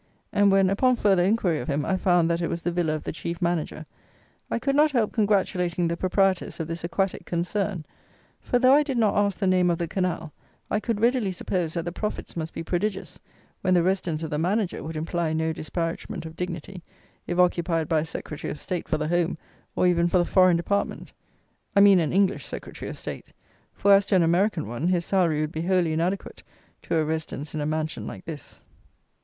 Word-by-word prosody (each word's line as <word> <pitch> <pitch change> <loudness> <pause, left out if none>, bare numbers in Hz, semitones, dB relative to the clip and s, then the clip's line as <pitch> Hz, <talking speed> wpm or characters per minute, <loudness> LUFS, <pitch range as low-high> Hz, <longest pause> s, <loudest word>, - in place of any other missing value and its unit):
And, 200 -1 +4
when, 195 -1 +4
upon 255 +5 +3
further 195 -6 +3
inquiry 185 -5 +1
of - - -6
him, 145 -1 -1
I 190 - +1
found 175 -3 +3
that 170 0 0
it 170 - 0
was 170 - -4
the 175 - 0
villa 170 -3 0
of 155 - -6
the - - -3
chief 170 +1 -5
manager, 170 -2 -2 0.6
I - - 0
could 275 +3 0
not 300 +2 +5
help 240 -7 0
congratulating 185 -5 +1
the 170 - -1
proprietors 190 +1 0
of 160 - -3
this 165 0 -5
aquatic 185 +3 -1
concern; 180 0 -2 0.5
for, 245 - 0
though 255 +1 +5
I 290 - +6
did 280 -4 -2
not 220 -3 +2
ask 205 -2 +1
the 200 - -1
name 185 -1 +3
of 170 - +1
the 170 - -2
canal, 180 -4 -2 0.4
I 210 - +2
could 225 -1 -2
readily 235 -4 +2
suppose, 180 -2 -2
that 170 -1 -2
the 175 - -3
profits 210 +4 -5
must 165 -1 -4
be - - -6
prodigious, 195 +4 -3 0.4
when 185 -1 +2
the 175 - +4
residence 175 -4 -1
of 160 - -4
the 150 - -1
manager 190 +3 0
would 160 +1 -6
imply 160 +1 -1
no 160 0 0
disparagement 165 +3 -4
of 160 0 -8
dignity, 180 +1 -5 0.5
if 175 - -2
occupied 170 -3 +2
by 160 - +2
a 155 - -2
Secretary 150 -1 -6
of - - -5
State 180 +3 -4
for - - +1
the 155 - -2
Home, 175 0 0 0.4
or - - +2
even 175 -1 +3
for 180 - +2
the 175 - +3
Foreign, 185 -2 +4
department. 200 +4 -2 0.6
I - - +6
mean 200 -2 +7
an 160 -3 0
English 195 0 +1
Secretary - - -7
of - - -7
State; - - -7 0.4
for, 200 - +4
as 200 0 +4
to - - +2
an 180 - +5
American 175 - +1
one, 120 +9 -2
his 175 -2 +1
salary 170 -6 +2
would 155 0 -2
be 160 - -4
wholly 175 -2 +1
inadequate 175 +5 -2 0.4
to - - -2
a 160 -1 +2
residence 155 -2 -4
in 155 - -2
a 145 - -1
mansion 155 0 -3
like - - -8
this. 155 -5 -9
175 Hz, 215 wpm, -25 LUFS, 165-195 Hz, 0.6 s, mean